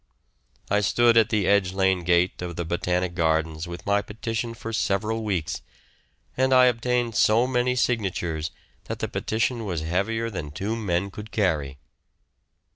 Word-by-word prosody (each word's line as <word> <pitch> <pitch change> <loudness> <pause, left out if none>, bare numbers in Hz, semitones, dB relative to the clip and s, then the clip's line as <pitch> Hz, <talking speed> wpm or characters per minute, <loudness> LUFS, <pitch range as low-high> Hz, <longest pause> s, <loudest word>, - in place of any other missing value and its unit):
I 105 - +2
stood 115 +4 +3
at 115 -1 +5
the 105 -4 +1
Edge 100 -2 +3
Lane 95 -2 +2
gate 90 +1 +2
of 90 -1 -5
the 85 - -3
Botanic 90 +1 -1
Gardens 80 -1 0
with 85 -1 -8
my 100 0 +2
petition 115 +2 -4
for 115 0 -7
several 110 +2 0
weeks, 95 -7 -2 0.7
and 130 0 +2
I 130 0 +7
obtained 120 0 +1
so 115 +1 +4
many 125 0 +1
signatures 90 -10 -1 0.4
that - - -4
the - - -2
petition 115 +2 -1
was 90 -7 -3
heavier 105 +8 -1
than 85 -7 -5
two 100 +9 -3
men 100 -3 -1
could 105 +2 -9
carry. 75 -11 0
100 Hz, 155 wpm, -25 LUFS, 85-115 Hz, 0.7 s, I